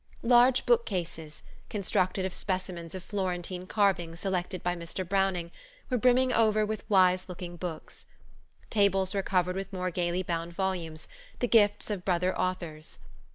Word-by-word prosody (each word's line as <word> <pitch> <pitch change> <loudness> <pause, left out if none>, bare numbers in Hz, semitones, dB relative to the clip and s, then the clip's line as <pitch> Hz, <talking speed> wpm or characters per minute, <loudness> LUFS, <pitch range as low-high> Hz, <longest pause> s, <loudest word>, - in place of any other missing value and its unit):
Large 245 +1 +5
bookcases, 175 -10 -1 0.3
constructed 190 -2 0
of 190 - -3
specimens 185 -3 -4
of 185 - -6
Florentine 185 -2 -3
carving 190 -6 +1
selected 180 0 -3
by 175 0 0
Mr. 170 +2 -5
Browning, 190 -3 0 0.4
were 250 - +2
brimming 255 +1 +4
over 215 -1 +3
with 215 0 -5
wise 185 -2 +4
looking 175 -1 -7
books. 170 -2 -7 0.6
Tables 195 -2 +2
were 200 - +1
covered 180 -1 0
with 195 +1 -4
more 185 -1 -2
gayly 175 +1 -1
bound 170 -1 -3
volumes, 170 -4 -3 0.3
the 245 - 0
gifts 210 -2 +3
of 195 -4 -3
brother 180 0 +1
authors. 170 -4 -3
185 Hz, 145 wpm, -29 LUFS, 175-200 Hz, 0.6 s, Large